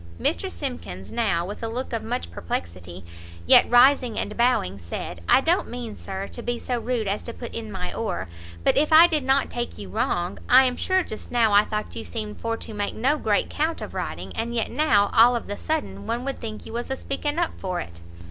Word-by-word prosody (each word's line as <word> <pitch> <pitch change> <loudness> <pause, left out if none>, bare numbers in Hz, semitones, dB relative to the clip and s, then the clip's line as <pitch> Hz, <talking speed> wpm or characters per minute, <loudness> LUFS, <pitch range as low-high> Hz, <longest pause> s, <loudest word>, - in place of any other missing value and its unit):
Mr 85 +3 0
Simkins 85 +2 -6
now, 200 -8 0
with 205 +3 -7
a 225 - -2
look 245 +3 -4
of 230 - -1
much 85 0 -4
perplexity, 85 +1 -5 0.4
yet - - +7
rising 245 -1 +5
and 210 - -3
bowing, 235 - +1
said 85 0 -6
"I - - +6
don't 340 +6 +1
mean, 240 -3 -6
Sir, 195 0 -6
to 240 - -7
be 240 0 -2
so 245 0 -2
rude 235 -3 -1
as 200 +2 -1
to 235 - -7
put 240 - -8
in 220 -2 -4
my 180 -2 -4
oar, 215 - -3 0.4
but - - +3
if 300 +2 +2
I 320 +2 +10
did 315 -5 +1
not 265 +1 +2
take 240 0 -4
you 100 -2 -8
wrong, 175 - -1
I'm 255 0 +6
sure 375 +5 +1
just 215 - -8
now 230 -3 +3
I 205 +1 +6
thought 215 -1 -4
you 225 - -4
seemed 215 -2 -6
for 230 0 -1
to 225 - -8
make 205 -1 -2
no 265 +6 +2
great 210 -5 +1
'count 320 +2 -1
of - - -7
riding, - - -5
and 235 +1 -3
yet 225 - -1
now, 235 -8 +3
all 240 +2 +6
of 235 - -3
the 205 - -4
sudden, 315 +1 -3
one 235 +3 -2
would 275 - -3
think 220 -2 -6
you - - -9
was 240 +2 -4
a 265 - -2
speaking 290 +3 -3
up 345 -1 +1
for 185 -2 -2
it!" 85 - -8
225 Hz, 225 wpm, -24 LUFS, 190-255 Hz, 0.4 s, I